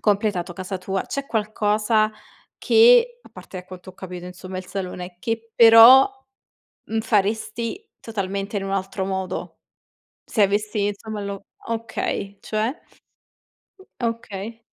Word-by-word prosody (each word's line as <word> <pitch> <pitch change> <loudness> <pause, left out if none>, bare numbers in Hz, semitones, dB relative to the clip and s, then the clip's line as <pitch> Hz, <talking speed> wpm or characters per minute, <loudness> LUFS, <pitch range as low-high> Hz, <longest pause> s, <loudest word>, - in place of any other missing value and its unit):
completato 200 -4 0
casa 185 +1 -5
tua 190 +1 -2
c'è 280 0 -5
qualcosa 215 -1 +1 0.5
che, 480 +1 +5
a - - -16
parte - - -12
ecco - - -8
da 180 - -12
quanto 185 - -11
ho - - -21
capito 180 -1 -8
insomma 185 +1 -8
il 185 0 -6
salone, 180 -2 -6
che 225 +3 -4
però, 230 +3 +9 0.8
mhmm, 225 0 -2
faresti 220 - -1
totalmente 200 -1 -4
in 200 - -1
un 195 - -4
altro 190 0 -2
modo? 190 -1 -4 0.7
Se 220 - 0
avessi 205 +1 0
insomma 210 +1 -5
lo 200 -1 -6 0.2
okay, 225 -3 -3
cioè? 220 +7 -2 1.2
Okay. 230 -1 -4
210 Hz, 130 wpm, -23 LUFS, 190-225 Hz, 1.2 s, però